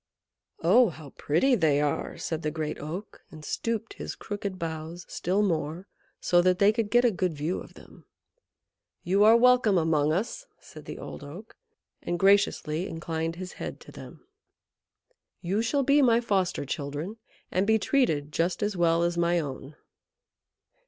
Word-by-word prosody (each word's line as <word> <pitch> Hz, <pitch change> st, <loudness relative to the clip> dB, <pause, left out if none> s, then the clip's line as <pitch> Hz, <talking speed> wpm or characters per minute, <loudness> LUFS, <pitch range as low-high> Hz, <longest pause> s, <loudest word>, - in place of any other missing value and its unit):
"Oh, 220 Hz, +7 st, +5 dB
how 155 Hz, -4 st, -11 dB
pretty 170 Hz, -, +1 dB
they 155 Hz, -10 st, +3 dB
are!" 145 Hz, -1 st, -2 dB
said 160 Hz, -1 st, -4 dB
the 155 Hz, -, -1 dB
Great 155 Hz, -1 st, -4 dB
Oak, 170 Hz, +8 st, -7 dB
and 155 Hz, -1 st, -12 dB
stooped 225 Hz, +3 st, -3 dB
his -, -, -7 dB
crooked 200 Hz, -2 st, -5 dB
boughs 165 Hz, +1 st, -6 dB
still 190 Hz, +4 st, 0 dB
more, 165 Hz, 0 st, -2 dB, 0.3 s
so 175 Hz, 0 st, +3 dB
that 180 Hz, 0 st, +3 dB
they 200 Hz, +2 st, +4 dB
could 225 Hz, -2 st, -1 dB
get 240 Hz, +3 st, +4 dB
a 240 Hz, -, +4 dB
good 180 Hz, -3 st, -1 dB
view 155 Hz, +5 st, -2 dB
of -, -, -12 dB
them. -, -, -16 dB, 1.0 s
"You 195 Hz, +4 st, +3 dB
are 225 Hz, +2 st, +7 dB
welcome 245 Hz, -5 st, +4 dB
among 155 Hz, -3 st, +2 dB
us," 235 Hz, -, -3 dB
said -, -, -13 dB
the -, -, -7 dB
Old -, -, -8 dB
Oak, 175 Hz, +10 st, -11 dB, 0.5 s
and 175 Hz, -, -2 dB
graciously 195 Hz, -3 st, +2 dB
inclined 165 Hz, 0 st, -4 dB
his 180 Hz, +1 st, -7 dB
head -, -, -5 dB
to -, -, -13 dB
them. -, -, -12 dB, 1.1 s
"You 195 Hz, +4 st, -1 dB
shall 275 Hz, +5 st, +1 dB
be 285 Hz, +2 st, +4 dB
my 235 Hz, -3 st, +4 dB
foster 195 Hz, -9 st, 0 dB
children, 145 Hz, +9 st, -5 dB, 0.3 s
and 185 Hz, +2 st, +1 dB
be 220 Hz, 0 st, +4 dB
treated 160 Hz, -, +1 dB
just 170 Hz, +5 st, -1 dB
as 205 Hz, -1 st, -1 dB
well 170 Hz, -1 st, +2 dB
as 170 Hz, 0 st, 0 dB
my 170 Hz, 0 st, +2 dB
own." 140 Hz, -1 st, -6 dB
180 Hz, 165 wpm, -27 LUFS, 160-210 Hz, 1.1 s, are